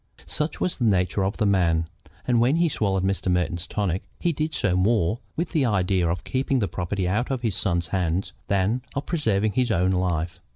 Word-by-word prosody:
Such 150 Hz, +1 st, -2 dB
was 180 Hz, -, -1 dB
the -, -, 0 dB
nature 95 Hz, -2 st, +2 dB
of 95 Hz, +2 st, -1 dB
the 110 Hz, -, +1 dB
man, 85 Hz, -5 st, +2 dB, 0.4 s
and 120 Hz, -2 st, +3 dB
when 125 Hz, +5 st, +3 dB
he 170 Hz, 0 st, +3 dB
swallowed 95 Hz, -8 st, 0 dB
Mr. 95 Hz, -1 st, 0 dB
Merton's 90 Hz, 0 st, 0 dB
tonics 95 Hz, -3 st, -2 dB
he 170 Hz, -, +1 dB
did 155 Hz, +2 st, -2 dB
so 90 Hz, -8 st, +1 dB
more 105 Hz, +1 st, +2 dB, 0.2 s
with 170 Hz, +2 st, -2 dB
the 155 Hz, -5 st, +2 dB
idea 95 Hz, -6 st, +1 dB
of 85 Hz, 0 st, -2 dB
keeping 135 Hz, +1 st, 0 dB
the 105 Hz, -5 st, +1 dB
property 95 Hz, +1 st, -2 dB
out 105 Hz, +7 st, 0 dB
of 130 Hz, -3 st, -2 dB
his 110 Hz, -5 st, 0 dB
son's 85 Hz, -3 st, 0 dB
hands 90 Hz, 0 st, -1 dB
than 100 Hz, +5 st, +1 dB
of 140 Hz, -, -2 dB
preserving 110 Hz, -, +1 dB
his 125 Hz, +2 st, +1 dB
own 95 Hz, -3 st, +2 dB
life. 90 Hz, -2 st, -1 dB
100 Hz, 205 wpm, -24 LUFS, 90-120 Hz, 0.4 s, and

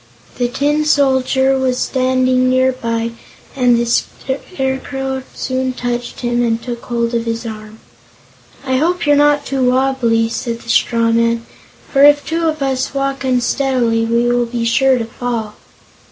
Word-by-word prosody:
The 245 Hz, -, +2 dB
Tin 290 Hz, +4 st, 0 dB
Soldier 265 Hz, -2 st, +2 dB
was 255 Hz, -1 st, 0 dB
standing 255 Hz, -1 st, +1 dB
near 260 Hz, 0 st, +3 dB
by 230 Hz, -2 st, -3 dB, 0.4 s
and 250 Hz, -3 st, +3 dB
the 235 Hz, -, 0 dB
Scarecrow 265 Hz, +1 st, -3 dB
soon 260 Hz, 0 st, -2 dB
touched 245 Hz, -1 st, -4 dB
him 240 Hz, 0 st, 0 dB
and 230 Hz, -1 st, 0 dB
took 235 Hz, 0 st, -6 dB
hold 235 Hz, -1 st, -1 dB
of 230 Hz, 0 st, -1 dB
his 230 Hz, +1 st, -3 dB
arm. 215 Hz, -1 st, -8 dB, 0.9 s
"I 260 Hz, -1 st, +1 dB
hope 345 Hz, +5 st, 0 dB
you're 290 Hz, 0 st, +4 dB
not 290 Hz, 0 st, +3 dB
wobbly," 255 Hz, -3 st, +2 dB
said 230 Hz, 0 st, -4 dB
the 235 Hz, -, -13 dB
straw 230 Hz, -1 st, +2 dB
man, 230 Hz, 0 st, +1 dB, 0.5 s
"for 275 Hz, -1 st, +5 dB
if 290 Hz, 0 st, +6 dB
two 330 Hz, +1 st, -1 dB
of 310 Hz, -2 st, -1 dB
us 265 Hz, 0 st, -2 dB
walk 275 Hz, 0 st, -2 dB
unsteadily 250 Hz, -2 st, +1 dB
we 235 Hz, +1 st, +1 dB
will 240 Hz, 0 st, +1 dB
be 230 Hz, 0 st, -3 dB
sure 260 Hz, +3 st, +3 dB
to 230 Hz, -, -2 dB
fall." 225 Hz, -2 st, -4 dB
255 Hz, 155 wpm, -16 LUFS, 235-270 Hz, 0.9 s, if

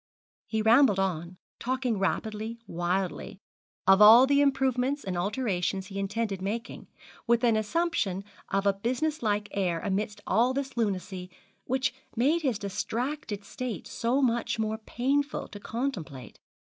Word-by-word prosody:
He 220 Hz, -1 st, -1 dB
rambled 230 Hz, -1 st, +6 dB
on, 180 Hz, -2 st, -2 dB, 0.2 s
talking 250 Hz, -3 st, -1 dB
rapidly, 220 Hz, +3 st, -2 dB
wildly, 180 Hz, +1 st, -2 dB, 0.5 s
of 195 Hz, +2 st, +6 dB
all 225 Hz, +5 st, +10 dB
the 280 Hz, +1 st, +3 dB
improvements 270 Hz, 0 st, +1 dB
and 185 Hz, -2 st, -3 dB
alterations 190 Hz, -1 st, -1 dB
he 195 Hz, 0 st, -6 dB
intended 200 Hz, -1 st, -2 dB
making, 220 Hz, +4 st, -4 dB, 0.4 s
with 235 Hz, 0 st, +3 dB
an 230 Hz, -2 st, +4 dB
assumption 215 Hz, -, 0 dB, 0.3 s
of 195 Hz, +1 st, 0 dB
a 200 Hz, -, +4 dB
business 255 Hz, +10 st, -1 dB
like 210 Hz, -2 st, 0 dB
air 180 Hz, -4 st, 0 dB
amidst 205 Hz, +2 st, -2 dB
all 240 Hz, +6 st, +2 dB
this 275 Hz, -1 st, -3 dB
lunacy, 190 Hz, -4 st, -2 dB, 0.4 s
which 260 Hz, -1 st, 0 dB, 0.2 s
made 290 Hz, +9 st, +2 dB
his 260 Hz, -8 st, 0 dB
distracted 215 Hz, +3 st, -3 dB
state 240 Hz, -4 st, -5 dB
so 250 Hz, +4 st, 0 dB
much 235 Hz, -1 st, +1 dB
the 220 Hz, -, -1 dB
more 220 Hz, 0 st, -2 dB
painful 275 Hz, +6 st, -1 dB
to 205 Hz, -, -9 dB
contemplate. 195 Hz, -, -5 dB
220 Hz, 140 wpm, -28 LUFS, 195-255 Hz, 0.5 s, all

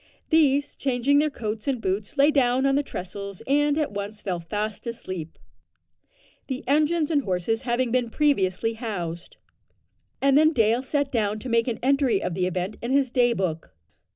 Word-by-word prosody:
These, 290 Hz, -2 st, +3 dB
changing 270 Hz, +2 st, +2 dB
their 305 Hz, +1 st, +2 dB
coats 220 Hz, -3 st, -5 dB
and 265 Hz, -3 st, 0 dB
boots, 200 Hz, +5 st, -3 dB
lay 285 Hz, +2 st, +5 dB
down 260 Hz, -2 st, +2 dB
on 275 Hz, -, +3 dB
the 285 Hz, -, +3 dB
trestles, 200 Hz, -5 st, -7 dB
and 290 Hz, +1 st, +2 dB
at 305 Hz, -6 st, 0 dB
once 205 Hz, +1 st, -6 dB
fell 180 Hz, -3 st, -2 dB
fast 210 Hz, +6 st, -4 dB
asleep 185 Hz, -8 st, -6 dB, 1.1 s
the 260 Hz, -1 st, -4 dB
engine 305 Hz, +3 st, +2 dB
and 290 Hz, -3 st, +3 dB
horses 195 Hz, +2 st, -1 dB
having 240 Hz, 0 st, +1 dB
been 245 Hz, -1 st, +1 dB
previously 225 Hz, -6 st, +1 dB
housed 180 Hz, -7 st, -5 dB, 0.8 s
and 275 Hz, 0 st, +3 dB
then 310 Hz, +2 st, +5 dB
Dale 230 Hz, -1 st, +3 dB
sat 280 Hz, +1 st, -1 dB
down 215 Hz, -3 st, 0 dB
to 255 Hz, -, -6 dB
make 230 Hz, 0 st, +2 dB
an 235 Hz, -3 st, -1 dB
entry 265 Hz, -5 st, +3 dB
of 180 Hz, -, -3 dB
the 180 Hz, +1 st, 0 dB
event 185 Hz, +3 st, -3 dB
in 235 Hz, -, -4 dB
his 270 Hz, -2 st, +2 dB
day 245 Hz, -1 st, +3 dB
book. 165 Hz, -, -3 dB
240 Hz, 175 wpm, -25 LUFS, 200-275 Hz, 1.1 s, lay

